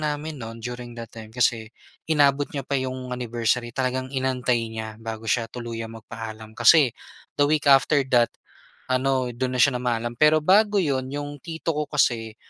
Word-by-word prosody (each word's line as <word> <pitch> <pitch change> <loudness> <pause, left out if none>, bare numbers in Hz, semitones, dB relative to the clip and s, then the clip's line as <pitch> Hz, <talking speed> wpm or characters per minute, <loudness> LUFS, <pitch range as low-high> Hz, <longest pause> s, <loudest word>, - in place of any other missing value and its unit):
namin 150 -1 -3
nun 115 0 -8
during 120 -1 -6
that 115 -1 -8
time, 110 -1 -10
kasi 115 -1 0 0.4
inabot 145 -2 +3
niya 140 -2 -4
pa - - -8
'yong 130 -1 -5
anniversary, 120 0 -1
talagang 130 +1 -2
inantay 130 -3 0
niya 110 -1 -6
bago 110 0 -7
siya 115 - +2
tuluyang 115 -2 -6
magpaalam. 110 -1 -9
Kasi, 155 -5 +6 0.5
the 145 - +5
week 150 0 +1
after 140 +2 +5
that 120 -2 +4 0.6
ano, 130 -1 +1
do'n 130 +1 -3
na 125 - +3
siya 125 -3 +2
namaalam. 120 -1 -1
Pero 150 0 +5
bago 205 +4 +4
'yon, 130 -4 -1
'yong 145 +1 -5
tito 165 +2 -3
ko 150 -1 -2
kasi, 115 -7 0
125 Hz, 170 wpm, -24 LUFS, 115-145 Hz, 0.6 s, Kasi